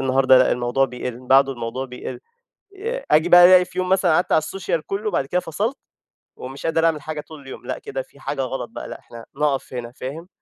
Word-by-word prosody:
النهارده 130 Hz, 0 st, +4 dB
لأ، 130 Hz, -, +4 dB
الموضوع 125 Hz, +2 st, +1 dB
بيقل، 125 Hz, 0 st, -6 dB
بعده 135 Hz, +1 st, +5 dB
الموضوع 120 Hz, +2 st, -5 dB
بيقل. 125 Hz, 0 st, -8 dB, 0.6 s
ي 465 Hz, +6 st, -4 dB
آجي 160 Hz, +3 st, +4 dB
بقى، 175 Hz, 0 st, +9 dB
ألاقي 180 Hz, 0 st, +7 dB
في 180 Hz, 0 st, -14 dB
يوم 185 Hz, 0 st, -1 dB
مثلًا، 185 Hz, -3 st, +3 dB
قعدت 175 Hz, -, 0 dB
على -, -, +5 dB
السوشال 165 Hz, -1 st, -3 dB
كلّه، 200 Hz, +2 st, -3 dB
وبعد 170 Hz, -, 0 dB
كده 180 Hz, +6 st, -1 dB
فصلت، 215 Hz, -, -3 dB, 0.6 s
ومش 135 Hz, +4 st, -8 dB
قادر 165 Hz, 0 st, +2 dB
أعمل 155 Hz, -3 st, +1 dB
حاجة 155 Hz, 0 st, -5 dB
طول 155 Hz, -2 st, -13 dB
اليوم. 135 Hz, -1 st, -11 dB
لأ، -, -, -3 dB
كده 465 Hz, +3 st, -5 dB
في -, -, -18 dB
حاجة -, -, -3 dB
غلط -, -, -4 dB
بقى، -, -, -7 dB
لأ، -, -, -8 dB
إحنا 115 Hz, -1 st, -12 dB
نقف 140 Hz, -3 st, -1 dB
هنا، 120 Hz, -1 st, -5 dB
فاهم؟ 145 Hz, +8 st, -7 dB
150 Hz, 220 wpm, -22 LUFS, 130-180 Hz, 0.6 s, بقى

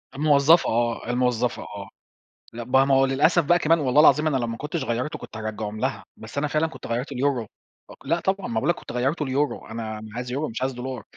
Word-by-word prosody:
الموظفة 150 Hz, +3 st, +4 dB
آه، 120 Hz, 0 st, -1 dB
الموظفة 125 Hz, -1 st, 0 dB
آه، 100 Hz, -1 st, -9 dB, 0.6 s
لأ 120 Hz, 0 st, -6 dB
ما 135 Hz, +3 st, +3 dB
هو 135 Hz, 0 st, +5 dB
للأسف 155 Hz, +6 st, +3 dB
بقى 175 Hz, +3 st, +4 dB
كمان 165 Hz, +1 st, +3 dB
والله 140 Hz, +1 st, +4 dB
العظيم 150 Hz, +1 st, +5 dB
أنا 140 Hz, -3 st, +1 dB
لو 120 Hz, -2 st, -2 dB
ما 115 Hz, 0 st, -4 dB
كنتش 150 Hz, +2 st, -4 dB
غيّرته 120 Hz, +6 st, -3 dB
كنت -, -, -9 dB
هرجعهم 110 Hz, -1 st, -5 dB
لها، -, -, -2 dB
بس 110 Hz, +5 st, -11 dB
أنا 150 Hz, +1 st, +1 dB
فعلًا 155 Hz, +2 st, +1 dB
كنت -, -, -10 dB
غيّرته 125 Hz, +4 st, -3 dB
ليورو. 125 Hz, -4 st, 0 dB, 0.6 s
لأ 170 Hz, +1 st, +1 dB
طبعًا 190 Hz, +2 st, -1 dB
ما -, -, -5 dB
باقول 130 Hz, +9 st, 0 dB
لك 175 Hz, -, +3 dB
كنت -, -, -10 dB
غيّرته 135 Hz, +6 st, -1 dB
ليورو، 140 Hz, +3 st, -1 dB
أنا 110 Hz, -1 st, -6 dB
عايز 125 Hz, 0 st, -5 dB
يورو 145 Hz, +2 st, -2 dB
مش 115 Hz, +3 st, -6 dB
عايز 130 Hz, 0 st, -1 dB
دولار، 125 Hz, -2 st, -6 dB
130 Hz, 215 wpm, -24 LUFS, 115-150 Hz, 0.6 s, هو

